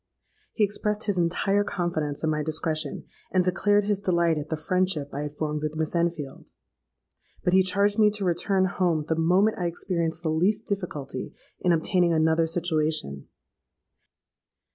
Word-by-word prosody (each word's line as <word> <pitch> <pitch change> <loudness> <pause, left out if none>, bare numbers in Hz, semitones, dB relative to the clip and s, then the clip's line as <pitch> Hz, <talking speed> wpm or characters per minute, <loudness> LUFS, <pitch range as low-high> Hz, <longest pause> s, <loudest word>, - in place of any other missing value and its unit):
He 220 - +1
expressed 210 +1 -1
his 200 -4 0
entire 195 +4 +1
confidence 160 -7 -2
in 160 - +2
my 150 0 -1
discretion, 155 0 -2 0.3
and 185 -1 +3
declared 205 +3 +2
his 205 -1 0
delight 170 -4 +2
at 150 +1 -7
the 160 - -2
friendship 165 -2 -1
I 145 - -3
had 150 0 -6
formed 150 -1 -2
with 155 0 -3
Miss 155 -1 -2
Enfield. 165 -5 -2 0.9
But 180 - +1
he 190 - +6
charged 200 +3 +1
me 210 -1 +6
to 210 -2 -2
return 185 +2 +1
home 175 -4 0
the 160 - +1
moment 180 +7 +2
I 175 - 0
experienced 170 -1 -2
the 160 - 0
least 200 +7 +1
difficulty 180 -9 -4 0.2
in 180 - +2
obtaining 170 +1 +2
another 160 +1 +3
situation. 155 - -1
170 Hz, 160 wpm, -26 LUFS, 155-190 Hz, 0.9 s, he